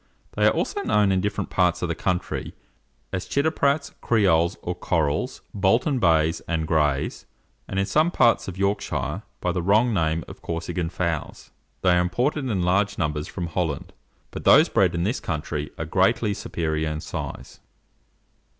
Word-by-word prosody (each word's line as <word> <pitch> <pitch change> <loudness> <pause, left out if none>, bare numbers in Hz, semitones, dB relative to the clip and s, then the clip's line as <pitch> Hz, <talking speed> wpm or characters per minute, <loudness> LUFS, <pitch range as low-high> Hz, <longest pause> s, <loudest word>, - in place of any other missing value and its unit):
They - - +2
are - - +5
also 410 - -2
known 105 - +2
in 95 -1 +2
different 105 +2 -2
parts 90 -1 +2
of - - +1
the 85 - -1
country, 90 +1 -2 0.6
as 95 - -3
Chitteprats, 140 0 +1
Creoles, 85 -7 +2
or 90 - -2
Corals, 75 -5 -1
Bolton 115 +8 +2
bays 80 -3 +3
and 80 -2 -1
grays, 75 -4 0 0.4
and, 95 - -4
in 100 - +2
some 155 - +2
parts 120 -9 +3
of 95 -1 -6
Yorkshire, 100 +1 -1 0.2
by 90 - 0
the 90 0 -1
wrong 110 +6 +3
name 80 -3 0
of - - -11
Corsican 85 +1 -3
fowls. 85 -3 -3 0.3
They 90 - +5
are 90 0 +4
imported 130 - 0
in 95 -5 0
large 100 +3 +1
numbers 75 -4 -1
from 90 - -4
Holland, 85 -3 -3 0.4
but - - -7
those - - +6
bred - - +2
in 85 - 0
this 110 +8 0
country 75 -2 -3
are 80 - -3
greatly 105 +6 +2
superior 80 -4 -2
in 75 0 -3
size. - - -7
90 Hz, 165 wpm, -24 LUFS, 80-105 Hz, 0.6 s, those